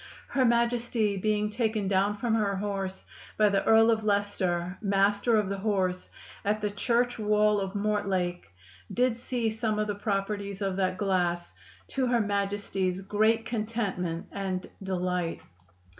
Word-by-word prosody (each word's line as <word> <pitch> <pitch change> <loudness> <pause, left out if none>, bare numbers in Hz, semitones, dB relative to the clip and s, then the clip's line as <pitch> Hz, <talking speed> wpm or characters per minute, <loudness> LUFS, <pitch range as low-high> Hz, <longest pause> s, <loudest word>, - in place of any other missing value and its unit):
Her 260 -2 +2
Majestie 235 -2 +1
being 210 +1 0
taken 215 -2 0
down 200 +2 +2
from 230 +1 -1
her 205 -3 +1
horse 195 -1 -3 0.3
by 215 -1 +5
the 200 -1 +1
Earle 225 +1 +6
of 220 -1 +1
Liecester, 190 -4 0
Master 205 +2 +3
of 210 -2 +1
the 195 0 -3
Horse, 190 -3 -1 0.3
at 210 +1 +1
the 210 -1 -1
church 240 +3 0
wall 210 0 +3
of 195 0 -4
Mortlake, 195 - -1 0.4
did 245 +3 +2
see 235 -1 -2
some 220 -1 -1
of 215 - +1
the 210 - -2
properties 200 -1 -2
of 195 -2 -1
that 185 -1 0
glass, 175 -3 0 0.4
to 265 -2 0
her 240 -1 +3
Majestie's 200 -2 -1
great 220 +3 +2
contentment 210 -7 -2
and 190 -2 -3
delight. 180 -2 -2
205 Hz, 145 wpm, -28 LUFS, 190-220 Hz, 0.4 s, Earle